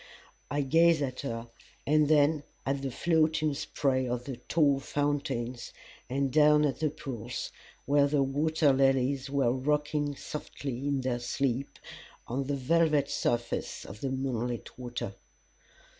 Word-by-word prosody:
I 145 0 0
gazed 165 +2 +4
at 130 -2 -4
her, 115 -3 -4 0.4
and 150 0 +4
then 150 0 +4 0.2
at 135 0 -1
the 135 - -2
floating 155 +2 +2
spray 130 -2 0
of 125 0 -3
the 135 -3 -5
tall 140 +2 +2
fountains, 135 -4 -2 0.4
and 135 0 0
down 150 0 +6
at 140 - -1
the 155 -1 +1
pools, 125 -6 -6 0.3
where 140 0 +4
the 140 -1 +2
waterlilies 135 -2 +2
were 135 -4 +2
rocking 145 +2 0
softly 140 -2 -5
in 140 -2 0
their 125 -1 -1
sleep 130 +2 -2 0.5
on 135 +3 -2
the 140 +1 -1
velvet 150 +1 +2
surface 120 0 -1
of 105 +2 -10
the 135 - -1
moonlit 125 -3 -3
water. 120 -1 -5
140 Hz, 135 wpm, -29 LUFS, 130-150 Hz, 0.5 s, down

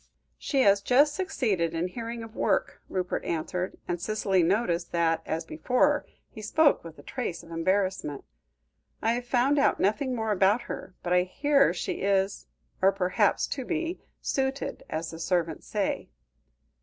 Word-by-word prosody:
"She 275 -2 +1
has 200 -3 +5
just 280 +7 +4
succeeded 215 - 0
in 170 +2 0
hearing 230 +2 -5
of 225 0 -11
work," - - 0
Rupert 180 -1 -2
answered, 180 +3 -3
and 175 -1 -2
Cicely 200 -3 +1
noticed 175 -1 +1
that, 165 -1 +2
as 160 +1 -2
before, 250 - +1 0.2
he 220 - -11
spoke 290 +7 +3
with 165 -1 -10
a 145 - -13
trace 240 - -4
of 165 - -14
embarrassment. 185 -3 0 0.8
"I 225 - +3
have 240 +1 -2
found 260 +4 +3
out 280 - +3
nothing 255 +6 +1
more 220 -2 -1
about 200 +3 +3
her, 185 - -7
but 180 - 0
I 180 - +5
hear 275 +9 +3
she - - -3
is, 195 0 +1 0.3
or 190 +1 +6
hopes 195 +2 +2
to 275 -2 -3
be, 330 +5 -2 0.2
'suited,' 270 0 -2
as 160 +1 -3
the 165 - -8
servants 165 -2 -1
say." - - -2
200 Hz, 160 wpm, -28 LUFS, 175-255 Hz, 0.8 s, or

